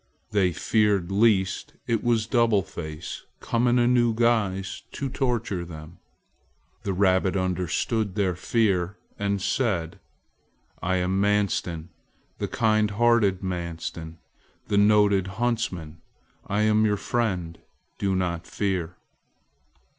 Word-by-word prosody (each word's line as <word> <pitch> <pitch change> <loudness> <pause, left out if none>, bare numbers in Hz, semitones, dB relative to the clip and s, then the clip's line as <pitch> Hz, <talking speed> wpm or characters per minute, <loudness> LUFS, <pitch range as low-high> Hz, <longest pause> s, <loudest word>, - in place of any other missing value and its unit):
They 100 -4 +2
feared 100 0 +1
lest 100 -2 +2
it 115 -2 0
was 115 -2 +2
Double 115 -4 +3
Face 80 -4 -7 0.2
come 120 +1 0
in 120 +1 +3
a 120 - +4
new 120 -2 +3
guise 105 -5 +1
to 140 - -3
torture 120 -8 -1
them. 80 0 -10 0.8
The 100 - -2
rabbit 95 0 +2
understood 95 +3 -1
their 100 -3 +1
fear 95 -2 0 0.2
and 100 0 0
said: 95 -6 -1 0.8
"I 95 +1 0
am 95 +1 0
Manstin, 100 -5 0 0.5
the - - -1
kind 110 -2 +2
hearted, 105 -3 +2
Manstin, 85 -2 -5 0.5
the 100 - +2
noted 100 -2 +4
huntsman. 95 -10 -2 0.5
I 100 +2 0
am 110 0 +3
your 105 -1 +2
friend. 90 -9 -2 0.4
Do 95 -1 0
not 85 -2 -2
fear." 95 -5 -2
100 Hz, 115 wpm, -25 LUFS, 90-110 Hz, 0.8 s, a